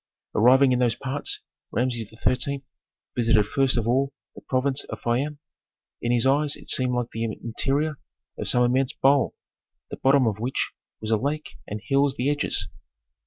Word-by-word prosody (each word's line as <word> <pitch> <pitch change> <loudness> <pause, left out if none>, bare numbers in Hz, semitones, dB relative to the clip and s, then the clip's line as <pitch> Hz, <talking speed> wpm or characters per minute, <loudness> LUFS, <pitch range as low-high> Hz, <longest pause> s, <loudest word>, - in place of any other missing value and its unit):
Arriving 130 +4 +5
in 125 - +2
those 120 -3 +2
parts 135 +3 -3 0.3
Rameses 120 -2 -1
XIII. 125 +5 -1 0.5
visited 115 -3 +3
first 135 +3 +2
of 115 -1 0
all 135 +3 +2 0.2
the - - -12
province 130 +1 0
of - - -7
Fayum. 135 +5 -1 0.6
In 120 - 0
his 120 0 +2
eyes 145 +2 +3
it - - -8
seemed 125 -1 +2
like 125 -1 -1
the 115 - -3
interior 135 +7 -1 0.4
of - - -5
some 125 - +3
immense 130 +2 +2
bowl, 140 0 +3 0.6
the - - -5
bottom 135 -1 +4
of 105 -2 0
which 125 +4 -1 0.3
was 110 0 -2
a 110 - +4
lake 145 +6 -2 0.2
and 105 - -4
hills 140 0 +2
the 135 +3 +1
edges. 145 - 0
130 Hz, 165 wpm, -25 LUFS, 120-140 Hz, 0.6 s, Arriving